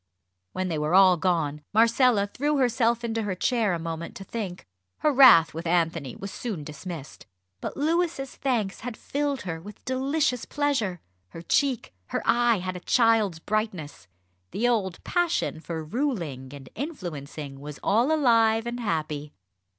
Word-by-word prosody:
When 185 0 -2
they 160 -4 -2
were 150 +4 +1
all 190 -1 +7
gone 160 -4 -1
Marcella 230 -1 +4
threw 290 +8 -1
herself 235 -2 +2
into 225 -1 -1
her 205 -3 -2
chair 220 0 +1
a - - -2
moment 165 0 -5
to 195 - -8
think. 195 -4 -6 0.4
Her 305 - +3
wrath 245 -12 +8
with 165 +2 -5
Anthony 165 -5 0
was 195 0 -7
soon 205 -11 -5
dismissed. 150 0 -8 0.3
But - - -6
Louis's 320 -2 0
thanks 230 -8 -1
had 240 -1 -6
filled 285 -2 -2
her 165 -3 -5
with 205 +3 -12
delicious 265 0 0
pleasure. 265 - -1 0.3
Her 165 - -10
cheek, 265 - 0
her - - -3
eye 240 -2 +3
had 185 0 -4
a - - -5
child's 225 -3 +3
brightness. 165 - -3 0.4
The 235 - 0
old 200 -7 -1
passion 345 - 0
for 160 0 -5
ruling 165 - -3
and 140 -2 -10
influencing 155 - -6
was 145 0 -8
all 235 +8 +3
alive 230 -6 +3
and 240 +1 -4
happy. 155 -8 -3
205 Hz, 155 wpm, -26 LUFS, 165-245 Hz, 0.4 s, wrath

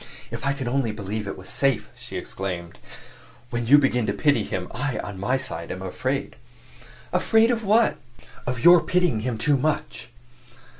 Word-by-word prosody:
"If - - -5
I 140 - +2
could 135 -3 -5
only 125 -2 0
believe 105 0 -5
it - - -5
was 95 - -11
safe!" 135 -4 0
she - - -7
exclaimed. 90 -3 -5 0.7
"When 120 -1 -2
you 145 +4 +8
begin 125 -5 +2
to - - +1
pity 145 -2 +2
him, - - -4
I, 145 -3 -2
on 100 -2 -6
my 125 +7 +1
side, 85 -11 -6
am 95 +1 -5
afraid." 95 - -3 0.8
"Afraid 225 +2 +4
of 230 -2 -1
what?" 215 +3 +3 0.5
"Of 125 -1 -2
your 175 -1 +8
pitying 180 -10 +1
him 115 +1 -2
too 140 +6 +2
much." 150 +3 -2
125 Hz, 170 wpm, -24 LUFS, 105-145 Hz, 0.8 s, you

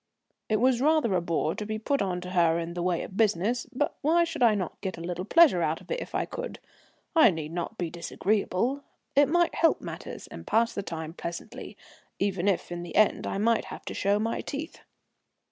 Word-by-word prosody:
It 215 - +3
was 250 +2 +3
rather 305 -7 +3
a 180 - +2
bore 165 -1 0
to - - -5
be 215 +1 -3
put 275 +6 0
on 180 -2 -1
to 180 0 -7
her 170 -2 +3
in 170 0 -4
the 175 - -3
way 175 -1 0
of 190 - -9
business; 220 +3 +1
but 290 +4 -1
why 330 +4 +4
should 330 -4 -4
I 230 -3 +6
not 185 -5 -4
get 190 -3 -4
a - - -8
little 175 +1 -4
pleasure 300 - +6
out 160 0 0
of - - -13
it - - 0
if - - -7
I - - +1
could? - - -6 0.6
I 315 -7 +8
need 160 -4 -4
not 175 +6 -4
be 170 -3 -3
disagreeable; 215 +8 -1 0.3
it 285 0 +5
might 345 +1 +3
help 330 - +3
matters - - -7
and - - -11
pass 230 +1 +2
the - - -2
time 160 -4 -6
pleasantly, 170 0 -7 0.4
even 195 -1 0
if 190 -3 0
in 175 0 -4
the 175 -2 -8
end 215 - +3
I - - -2
might 225 +3 +2
have - - -9
to - - -5
show 200 +1 +1
my 225 +2 -1
teeth. 300 +3 -6
205 Hz, 220 wpm, -28 LUFS, 175-255 Hz, 0.6 s, I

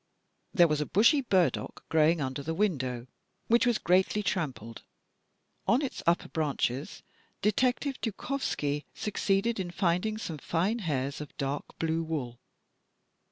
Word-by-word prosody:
There 175 -2 +6
was 150 -1 0
a 150 - -2
bushy 235 - +5
burdock 175 - 0
growing 160 +1 +4
under 130 +1 -3
the 160 +3 -3
window, 130 - 0 0.4
which 235 +2 +4
was 240 -2 +3
greatly 190 +4 +2
trampled. 130 - -3 0.9
On 250 +6 +3
its 270 - -4
upper 170 +1 +3
branches, 145 -3 -2 0.4
Detective 250 +6 +1
Dukovski 200 - -2
succeeded 205 +2 0
in 180 -2 -2
finding 180 +4 0
some 165 -8 -5
fine 185 - 0
hairs 140 - -2
of 150 - -10
dark 140 +1 -4
blue 165 0 0
wool. 140 -7 -4
170 Hz, 130 wpm, -29 LUFS, 145-210 Hz, 0.9 s, There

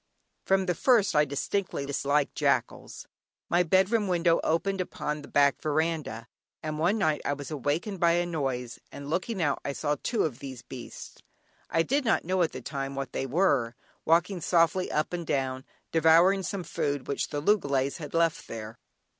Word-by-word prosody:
From 190 0 +3
the 180 - +1
first 225 -1 +3
I 150 0 +5
distinctly 145 +3 -2
disliked 140 +1 0
jackals. - - -1 0.4
My 175 - +4
bedroom 190 +5 +2
window 170 -2 +2
opened 190 +4 0
upon 150 -4 -4
the 145 - -11
back 140 -3 +3
veranda, 155 -7 -1 0.4
and 155 -1 -3
one 180 +7 +2
night 155 -7 +1
I 145 - 0
was 145 +1 -7
awakened 155 - -2
by 170 0 +4
a 175 +1 +1
noise, 135 -7 -3
and 140 +1 -8
looking 190 +5 -1
out 145 -2 +1
I 140 - -3
saw 145 +1 -1
two 230 -4 0
of 130 -6 -3
these 130 -3 -8
beasts 125 -3 -10 0.5
(I 165 - +2
did 280 - 0
not 225 - +1
know 185 +1 +1
at 165 - +2
the - - -7
time 135 -1 -4
what 135 0 -5
they 135 - -2
were) 135 -7 +1 0.3
walking 175 +3 +2
softly 175 +2 +2
up 150 +3 -1
and 175 -1 -2
down 130 -2 -1 0.3
devouring 165 +4 +5
some 190 +1 -4
food 145 -4 -2
which 140 - -1
the 145 - -3
loogalays 140 -7 +1
had 150 -1 -7
left 165 -1 +1
there. 110 0 -8
155 Hz, 180 wpm, -28 LUFS, 140-180 Hz, 0.5 s, I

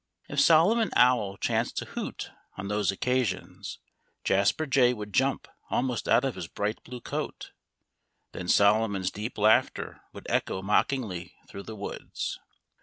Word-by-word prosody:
If - - -2
Solomon 195 +8 +5
Owl 115 -6 +4
chanced - - -1
to - - -2
hoot - - -6 0.3
on 100 0 -5
those 105 -1 +1
occasions, 95 -5 -2 0.5
Jasper 100 +11 +2
Jay 125 -3 +4
would 105 -2 -7
jump 135 +1 +1 0.2
almost 125 -1 -1
out 130 - +4
of 135 - -1
his 90 -3 -6
bright 105 +4 -3
blue 125 -1 -8
coat. - - -5 0.8
Then 90 - -6
Solomon's 100 -2 +3
deep 105 +3 -5
laughter 110 +1 +2
would - - -11
echo 95 - -1
mockingly 105 -3 0
through 100 - -8
the 110 - -6
woods. 100 - -5
105 Hz, 140 wpm, -28 LUFS, 100-125 Hz, 0.8 s, Solomon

